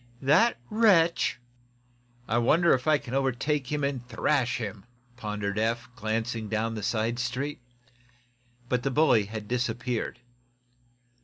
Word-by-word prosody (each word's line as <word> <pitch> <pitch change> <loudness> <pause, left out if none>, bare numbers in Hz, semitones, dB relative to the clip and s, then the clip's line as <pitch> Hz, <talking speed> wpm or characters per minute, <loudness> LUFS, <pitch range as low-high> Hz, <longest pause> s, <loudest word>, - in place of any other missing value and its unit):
"That 170 - +4
wretch 185 - +3 0.4
" 120 0 -35
"I - - +4
wonder 165 +8 +4
if 130 +3 -1
I 155 -1 +5
can 125 -3 -9
overtake 135 +1 0
him 150 -1 -1
and 140 -3 -1
thrash 135 -2 +1
him," 105 -5 -6 0.3
pondered 105 -3 -3
Eph, 115 +3 -1
glancing 110 0 -2
down 115 +1 -1
the 110 - -5
side 115 +3 -1
street. 130 +3 -3 1.1
The 125 +2 0
bully 130 -7 +4
had 105 0 -7
disappeared. 120 0 -2
120 Hz, 130 wpm, -27 LUFS, 115-140 Hz, 1.1 s, I